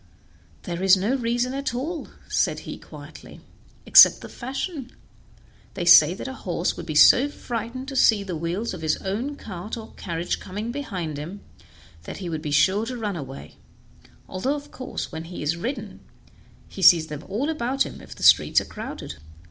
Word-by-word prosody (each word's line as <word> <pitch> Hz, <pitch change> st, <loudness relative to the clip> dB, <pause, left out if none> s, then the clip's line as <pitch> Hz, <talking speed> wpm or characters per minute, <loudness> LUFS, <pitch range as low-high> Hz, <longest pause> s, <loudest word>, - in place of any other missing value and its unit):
"There 175 Hz, -1 st, -5 dB
is 190 Hz, 0 st, +6 dB
no 205 Hz, +7 st, 0 dB
reason 240 Hz, 0 st, -1 dB
at 275 Hz, -3 st, -3 dB
all," 310 Hz, +6 st, -4 dB, 0.2 s
said -, -, 0 dB
he -, -, -8 dB
quietly, -, -, -12 dB, 0.5 s
"except -, -, +8 dB
the -, -, -9 dB
fashion; 265 Hz, +1 st, -5 dB, 0.8 s
they 175 Hz, -, -3 dB
say 170 Hz, 0 st, +8 dB
that 205 Hz, -, -7 dB
a 265 Hz, -, -5 dB
horse -, -, -2 dB
would -, -, -8 dB
be -, -, -4 dB
so 280 Hz, +3 st, +7 dB
frightened 245 Hz, -1 st, -6 dB
to 270 Hz, -, -7 dB
see 220 Hz, -5 st, +4 dB
the 185 Hz, -3 st, -5 dB
wheels 175 Hz, +8 st, -3 dB
of 180 Hz, -, -7 dB
his 155 Hz, -1 st, 0 dB
own 230 Hz, +10 st, -3 dB
cart 205 Hz, -1 st, -7 dB
or 220 Hz, -1 st, -10 dB
carriage 170 Hz, -1 st, -3 dB
coming 210 Hz, +5 st, -5 dB
behind 185 Hz, -, -5 dB
him 180 Hz, +7 st, -8 dB, 0.6 s
that -, -, -7 dB
he 185 Hz, -3 st, -6 dB
would 160 Hz, -2 st, -4 dB
be 150 Hz, -, -4 dB
sure 190 Hz, +10 st, +2 dB
to 250 Hz, 0 st, -5 dB
run 210 Hz, -4 st, -3 dB
away, 135 Hz, -, -9 dB, 0.7 s
although 255 Hz, +10 st, -2 dB
of 290 Hz, 0 st, -9 dB
course 255 Hz, -, -6 dB
when 160 Hz, +1 st, -6 dB
he 175 Hz, -2 st, -7 dB
is 150 Hz, +3 st, 0 dB
ridden 225 Hz, +2 st, -5 dB, 0.7 s
he 195 Hz, -, -9 dB
sees 170 Hz, -3 st, +7 dB
them 150 Hz, 0 st, -8 dB
all 225 Hz, +9 st, -1 dB
about 275 Hz, -4 st, 0 dB
him -, -, -9 dB
if -, -, -12 dB
the -, -, -9 dB
streets -, -, +6 dB
are -, -, -7 dB
crowded. -, -, -8 dB
205 Hz, 185 wpm, -24 LUFS, 170-255 Hz, 0.8 s, except